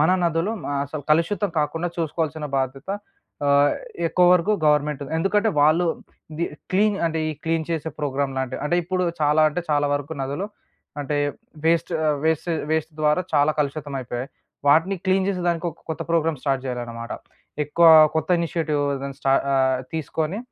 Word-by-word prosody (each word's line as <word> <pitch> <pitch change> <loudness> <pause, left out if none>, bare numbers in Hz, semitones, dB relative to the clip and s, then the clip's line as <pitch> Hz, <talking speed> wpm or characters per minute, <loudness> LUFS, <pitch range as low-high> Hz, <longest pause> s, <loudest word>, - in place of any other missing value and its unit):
మన 155 +4 +4
నదులు 170 +6 0 0.3
అసలు 145 +1 -6
కలుషితం 195 +6 +2
కాకుండా 165 +3 -1
చూసుకోవాల్సిన 160 -2 -2
బాధ్యత 135 +5 -4 0.6
ఆహ్, 140 0 +5 0.4
ఎక్కువ 180 - +3
వరకు 180 +4 +3
గవర్నమెంట్‍ది. 150 -1 +1
ఎందుకంటే 205 +5 +2
వాళ్ళు 160 +4 +4 0.5
ఇది 165 +3 -1 0.3
క్లీన్ 205 +1 +3
అంటే, 160 0 -1
ఈ - - -1
క్లీన్ 165 -1 0
చేసే 160 -1 -2
ప్రోగ్రామ్ 140 -2 -1
లాంటివి. 130 -1 -3
అంటే 175 +4 +1
ఇప్పుడు 185 +1 -1 0.2
చాలా 150 +1 +3
అంటే 155 +4 -3
చాలా 145 0 +2
వరకు 145 +2 -4
నదులు 145 +9 -3 0.5
అంటే 145 +1 -2 0.5
వేస్ట్ 165 +1 +2 0.2
ఆహ్, 150 -2 +1
వేస్ట్ 160 +2 +1 0.2
వేస్ట్ 160 0 -1
ద్వారా 150 +3 +3
చాలా 145 +1 +4
కలుషితం 145 0 -3
అయిపోయాయి. 125 +1 -5 0.4
వాటిని 165 +7 +4
క్లీన్ 190 0 +2
జేసే 180 -3 -1
దానికి, 170 0 -1
ఒక - - -18
కొత్త 160 - -3
ప్రోగ్రామ్ 165 -3 +1
స్టార్ట్ 135 -2 0
చేయాలనమాట. 120 -1 -5 0.5
ఎక్కువ 165 +3 +3 0.3
కొత్త 160 - -1
ఇనిషియేటివ్ 160 -3 -1
ఏదన్నా 140 0 -6
స్టా 135 0 +3 0.2
ఆహ్, 130 -1 +2
తీసుకొని 160 +4 -2
155 Hz, 155 wpm, -23 LUFS, 140-170 Hz, 0.6 s, ఆహ్